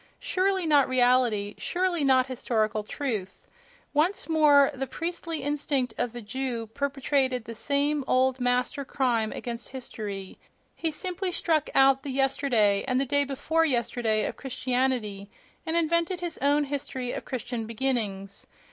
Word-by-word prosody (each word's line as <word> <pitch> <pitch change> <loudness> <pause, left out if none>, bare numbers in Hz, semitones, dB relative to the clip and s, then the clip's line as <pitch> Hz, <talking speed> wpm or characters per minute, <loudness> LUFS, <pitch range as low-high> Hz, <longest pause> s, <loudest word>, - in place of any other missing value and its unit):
Surely 380 -1 0
not 290 -4 +4
reality; 245 -5 +2
surely 355 -3 0
not 260 -2 +4
historical 220 -4 -1
truth!... 210 -4 -5 0.5
Once 325 +7 +1
more 295 -4 +5
the 270 0 -4
priestly 330 -1 -4
instinct 280 -4 -1
of 245 - -2
the 240 0 -8
Jew 245 0 -3
perpetrated 270 -3 0
the 230 - -6
same 285 +4 0
old 260 0 +2
master 250 +3 0
crime 240 -5 0
against 235 -2 -6
history—he 215 - -6
simply 365 +4 -2
struck 320 -4 +1
out 270 0 +5
the 280 - -6
yesterday 260 -6 +2
and 255 0 +1
the 275 - +1
day 285 +2 +3
before 295 +4 0
yesterday 235 -5 +1
of - - -4
Christianity, 250 -6 -2 0.4
and 325 +1 +1
invented 335 +2 +1
his 345 -1 -5
own 290 +1 +3
history 270 -3 -3
of - - -5
Christian 240 -3 -4
beginnings. 215 -5 -3
265 Hz, 140 wpm, -27 LUFS, 235-290 Hz, 0.5 s, more